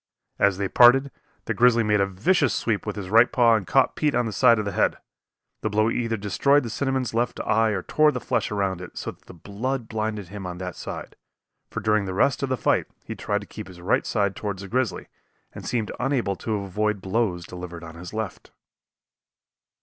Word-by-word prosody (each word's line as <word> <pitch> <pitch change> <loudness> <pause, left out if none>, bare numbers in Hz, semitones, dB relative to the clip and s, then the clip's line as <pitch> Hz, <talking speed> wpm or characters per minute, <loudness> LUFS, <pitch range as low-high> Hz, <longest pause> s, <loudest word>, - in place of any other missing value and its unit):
As 100 -2 +3
they 100 0 -1
parted, 130 +6 +6 0.3
the - - -1
grizzly 120 -1 +4
made 105 -1 +2
a 100 - +2
vicious 130 - +1
sweep 110 -2 -1
with 105 - -2
his 100 -2 -6
right 115 +3 +6
paw 120 -2 +5
and 100 -4 -2
caught 135 0 +3
Pete 150 -3 +1
on 120 0 +2
the 110 - -3
side 115 - +5
of 105 - -2
the 100 - -2
head. - - +1 0.6
The 110 - -1
blow 110 +2 +2
either 115 -1 -1
destroyed 140 +9 +2
the 115 - -5
cinnamon's 130 -3 -1
left 120 +1 -1
eye 110 +1 +2
or 100 -4 -2
tore 155 0 +3
the - - -3
flesh - - -1
around 95 -3 -1
it, 90 - -10
so - - -4
that - - -23
the - - -12
blood 115 +8 -4
blinded 110 -4 -3
him 100 -1 -7
on 90 -1 -6
that 90 -1 -5
side, - - -7 0.5
for - - -4
during 105 -2 +2
the 95 -1 -4
rest 130 +5 +2
of 140 - -1
the 130 - 0
fight - - +1 0.2
he - - -5
tried 105 0 -2
to 100 - -11
keep 105 -2 -8
his 90 -2 -12
right 90 +5 +1
side 100 -3 0
toward 100 -2 -4
the 100 +1 -8
grizzly 125 +3 -1 0.5
and - - -8
seemed 115 -3 -1
unable 125 -7 0
to 110 +3 -3
avoid 105 +1 -1
blows 95 -3 -1
delivered 90 -1 -8
on 80 -1 -9
his 85 +1 -9
left. 110 -3 -5
105 Hz, 220 wpm, -24 LUFS, 95-120 Hz, 0.6 s, parted